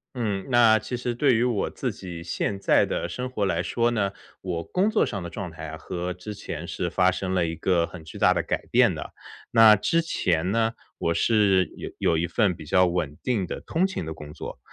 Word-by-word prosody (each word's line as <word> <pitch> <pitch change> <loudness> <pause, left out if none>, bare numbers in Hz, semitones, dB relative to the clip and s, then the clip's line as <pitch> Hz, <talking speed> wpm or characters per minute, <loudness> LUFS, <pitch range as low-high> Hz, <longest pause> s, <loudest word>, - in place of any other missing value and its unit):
嗯， 105 -5 -2
那 115 -3 +5
其 125 - -5
实 120 0 -2
对 130 +1 +3
于 115 - +2
我 120 -5 0
自 - - -3
己 85 -3 -8
现 100 - -2
在 - - +4
的 - - -2
生 125 0 -4
活 110 -6 -1
来 85 -3 0
说 115 +5 0
呢， 100 -4 0 0.3
我 85 -3 -3
工 185 - +1
作 - - +2
上 100 -4 -4
的 85 - -6
状 95 -2 -6
态 80 - -8
呀 80 0 -7
和 90 +2 -4
之 90 +4 -8
前 85 -5 -7
是 85 - -3
发 90 +1 +3
生 95 0 -3
了 90 -2 +2
一 80 0 -3
个 85 0 +1
很 85 -2 -11
巨 80 - -10
大 - - +4
的 - - 0
改 - - -3
变 - - +4
的。 - - -7 0.4
那 110 -2 +8
之 165 - +1
前 90 - 0
呢， 115 0 +1 0.2
我 85 - 0
是 100 -3 +3
有 - - -6
有 80 - +2
一 85 - +1
份 95 +1 +1
比 80 - -11
较 90 +5 +4
稳 85 -5 -2
定 115 -7 0
的 - - -6
通 175 +4 0
勤 190 - -3
的 80 - -5
工 75 -1 -10
作。 - - -8
95 Hz, 250 characters per minute, -25 LUFS, 85-115 Hz, 0.4 s, 那